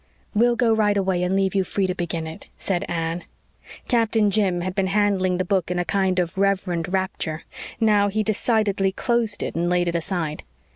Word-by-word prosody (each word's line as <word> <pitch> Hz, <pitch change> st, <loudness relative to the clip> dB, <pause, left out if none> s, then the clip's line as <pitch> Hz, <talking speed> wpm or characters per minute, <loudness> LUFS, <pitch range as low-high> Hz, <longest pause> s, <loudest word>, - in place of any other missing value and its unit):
"We'll 235 Hz, +2 st, +3 dB
go 235 Hz, -2 st, +3 dB
right 210 Hz, -2 st, +2 dB
away 190 Hz, -2 st, +1 dB
and 180 Hz, +1 st, +1 dB
leave 195 Hz, -1 st, +1 dB
you 195 Hz, -1 st, +2 dB
free 195 Hz, +1 st, -1 dB
to 185 Hz, -, -1 dB
begin 170 Hz, -2 st, -3 dB
it," 160 Hz, +1 st, -9 dB
said 180 Hz, -3 st, -1 dB
Anne. 165 Hz, 0 st, -2 dB, 0.6 s
Captain 225 Hz, -3 st, +2 dB
Jim 190 Hz, -4 st, +1 dB
had 185 Hz, +1 st, -3 dB
been 195 Hz, 0 st, 0 dB
handling 195 Hz, -2 st, +1 dB
the 185 Hz, -, -1 dB
book 185 Hz, -2 st, 0 dB
in 180 Hz, -, -1 dB
a 175 Hz, -, 0 dB
kind 190 Hz, -1 st, +1 dB
of 180 Hz, +1 st, -1 dB
reverent 190 Hz, -4 st, 0 dB
rapture. 185 Hz, -4 st, -2 dB, 0.4 s
Now 210 Hz, -3 st, +4 dB
he 215 Hz, +2 st, 0 dB
decidedly 210 Hz, -3 st, +1 dB
closed 230 Hz, 0 st, -1 dB
it -, -, -3 dB
and 170 Hz, +1 st, 0 dB
laid 180 Hz, 0 st, +2 dB
it 170 Hz, -, 0 dB
aside. 165 Hz, -3 st, -2 dB
190 Hz, 195 wpm, -23 LUFS, 175-205 Hz, 0.6 s, Now